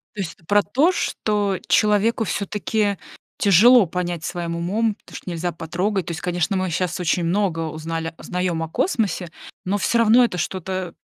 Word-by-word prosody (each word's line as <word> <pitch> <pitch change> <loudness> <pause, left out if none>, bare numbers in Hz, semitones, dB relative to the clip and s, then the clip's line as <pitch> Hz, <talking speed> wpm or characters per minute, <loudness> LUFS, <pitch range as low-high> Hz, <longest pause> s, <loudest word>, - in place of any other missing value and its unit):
То - - -5
есть 185 - -4
эт 160 - -26
про 205 0 +4
то, 285 - +2
что 205 - -1
человеку 210 +4 +3
всё-таки 205 0 -1 0.4
тяжело 225 - +6
понять 175 -1 -3
своим 170 -1 -3
умом 210 +6 0
то, - - -15
что - - -8
нельзя 170 0 -2
потрогать. 180 +4 -2
То - - -5
есть, 165 - -5
конечно, 180 +1 -1
мы 185 -1 -1
щас 175 +1 -2
очень 175 0 +1
много 180 -1 0
узнали 165 +1 -4
узнаём 180 -2 -2
о 160 - -3
космосе, 195 - -1 0.3
но 200 +3 0
всё 235 - +1
равно 230 +2 +6
это 180 -6 -2
что-то 185 +1 -3
185 Hz, 175 wpm, -22 LUFS, 170-210 Hz, 0.4 s, тяжело